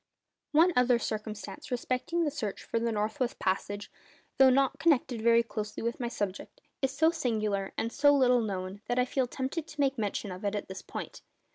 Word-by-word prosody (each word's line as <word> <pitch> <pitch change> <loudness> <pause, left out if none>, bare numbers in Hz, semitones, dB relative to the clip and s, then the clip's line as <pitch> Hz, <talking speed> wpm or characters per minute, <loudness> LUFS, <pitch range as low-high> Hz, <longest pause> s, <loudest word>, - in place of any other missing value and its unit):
One 330 +4 +5
other 250 -1 +4
circumstance 215 -3 -5
respecting 255 +7 -1
the 300 - 0
search 215 -8 -4
for 230 - -1
the 230 0 0
north 215 0 -2
west 250 -1 -1
passage, 200 +2 -2 0.5
though 265 0 +8
not 270 +1 +2
connected 265 -7 +2
very 235 +1 +5
closely 215 -2 -5
with 235 0 -2
my 240 - -1
subject, 205 - -4 0.2
is 270 - +2
so 315 +4 +3
singular 215 - -1
and 230 - -1
so 290 0 +5
little 250 -3 +4
known 195 -2 -4
that 245 - 0
I 250 - +4
feel 260 0 0
tempted 270 +6 -3
to 300 -2 -12
make 275 -3 +2
mention 205 -1 -2
of 185 +2 -8
it 205 0 0
at 205 - -4
this 190 0 -6
point. - - -7
235 Hz, 195 wpm, -30 LUFS, 210-270 Hz, 0.5 s, though